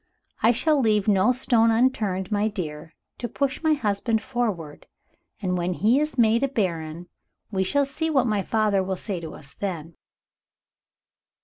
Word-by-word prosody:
I 230 - +5
shall 300 +5 +2
leave 215 -3 +2
no 200 +3 +4
stone 235 -2 +3
unturned, 220 -6 +1
my 210 +1 +1
dear, 160 -6 -6 0.2
to 240 - -3
push 275 +3 -2
my 315 -1 +3
husband 220 -2 0
forward. 215 - -4 0.6
And 180 -1 0
when 175 +1 -1
he 230 +9 +3
is 300 -2 -2
made 230 0 +4
a 275 - +2
Baron, 170 - -3 0.4
we 190 -2 +1
shall 280 +9 +2
see 300 +4 -2
what 270 -5 +2
my 210 -4 +1
father 210 -1 +1
will 190 0 -2
say 185 0 -4
to 165 -2 -8
us 140 -2 -12
then." 170 -3 -5
210 Hz, 165 wpm, -24 LUFS, 185-245 Hz, 0.6 s, I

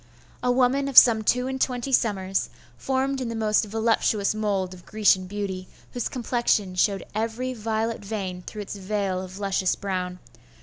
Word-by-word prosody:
A 250 - +2
woman 260 +2 +2
of 275 - -3
some 225 -3 +9
two 250 +3 +2
and 265 0 -4
twenty 250 +1 -1
summers, 195 -6 +1 0.3
formed 265 0 -1
in 245 - -3
the 230 - -4
most 215 -1 +2
voluptuous 220 -1 +1
mould 200 -4 -1
of 180 -1 -13
Grecian 200 -4 +2
beauty, 190 -2 -4 0.3
whose 245 - -2
complexion 235 -6 0
showed 195 +2 +1
every 230 +4 -2
violet 225 -1 -2
vein 195 -3 -4
through 210 +3 -7
its 200 - -7
veil 195 -1 -2
of 185 0 -9
luscious 195 -2 0
brown. 185 -2 -3
215 Hz, 165 wpm, -25 LUFS, 195-240 Hz, 0.3 s, some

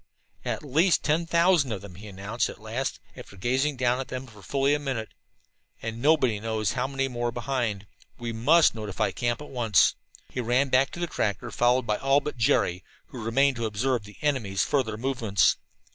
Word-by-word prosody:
"At - - -3
least 160 +6 +2
ten 160 +3 +1
thousand 170 -5 +3
of 105 - -3
them," 100 -3 -10
he 100 +5 -11
announced 100 +4 -2
at - - -9
last, 115 +5 -3 0.2
after 100 - -12
gazing 130 +7 0
down 125 0 +1
at 135 - -4
them 130 +1 -5
for 110 -5 -15
fully 135 +8 +1
a 145 - +1
minute. 130 -6 -3 0.7
"And 115 +1 -5
nobody 130 -7 +3
knows 110 -3 -1
how 125 +1 -1
many 135 -1 -1
more 120 -2 -2
behind. 120 -4 -2 0.3
We 120 -1 -4
must 150 +9 +5
notify 105 -3 -2
the - - -9
camp 120 +4 -1
at - - -11
once." 115 -6 +3 0.4
He 130 - -2
ran 125 +4 +2
back 130 +2 +3
to - - -7
the 175 - 0
tractor, 115 - -2
followed 125 +1 +2
by 105 -2 0
all 135 +1 +3
but 150 - -5
Jerry, 95 -6 +1 0.3
who 120 -4 -8
remained 135 +4 +2
to 115 -1 -1
observe 115 +1 -1
the 105 0 -13
enemy's 115 -10 +1
further 115 -7 0
movements. 115 - +2
120 Hz, 195 wpm, -26 LUFS, 110-135 Hz, 0.7 s, must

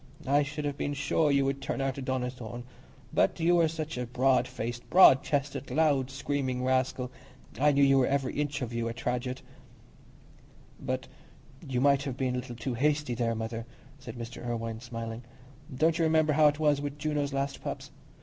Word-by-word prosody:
I 140 +2 +3
should 145 +1 -4
have 145 -1 -3
been 145 - -1
sure 150 +2 +1
you 140 -1 +3
would 135 0 -1
turn 135 - -3
out 135 0 -1
a - - -4
Donnithorne. 125 -2 -4 0.5
But - - +2
you 175 +2 +4
were 165 -1 +4
such 155 -3 -4
a 125 - -3
broad 130 +2 +2
faced, 120 -1 -5
broad 175 -7 +8
chested, 140 -1 -2
loud 140 -2 +2
screaming 135 -2 -2
rascal, 130 -1 0 0.5
I 150 +2 +5
knew 140 0 +3
you 135 -1 +5
were 125 - +3
every 135 -2 0
inch 145 -2 -2
of 120 -1 -5
you 115 0 -1
a 115 - -6
Tradgett." 125 +2 -3 1.4
"But - - -3 0.6
you 125 -2 -1
might 140 0 +4
have 135 -3 -4
been 130 -1 0
a - - -1
little 125 -1 -7
too 120 +2 -3
hasty 145 +1 +1
there, 115 -1 0
Mother," 115 +1 -4 0.3
said 115 -3 -9
Mr. 115 +1 -7
Irwine, 115 -2 -3
smiling. 115 -1 -6 0.5
"Don't 160 +5 +1
you - - +3
remember 155 -1 +3
how 155 +1 +6
it 145 0 +2
was 150 -2 +2
with 145 0 -4
Juno's 150 -1 -1
last 140 0 -2
pups? - - -6
135 Hz, 190 wpm, -29 LUFS, 125-145 Hz, 1.4 s, broad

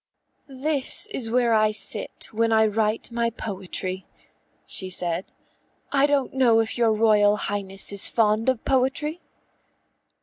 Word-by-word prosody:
"This 275 +1 +1
is 230 -4 -3
where 240 0 +2
I 215 -1 +3
sit 215 0 -1
when 225 +1 0
I 220 0 +4
write 215 +2 -1
my 235 0 0
poetry," 190 -3 -6 0.6
she 185 - 0
said. 180 0 -1 0.6
"I 280 0 +3
don't 285 -2 0
know 245 -4 +3
if 225 -1 -1
your 235 -2 +2
Royal 210 -1 +3
Highness 195 -2 -2
is 200 -1 0
fond 220 +1 +1
of 260 -3 -2
poetry?" 275 +5 -1
225 Hz, 135 wpm, -23 LUFS, 205-255 Hz, 0.6 s, I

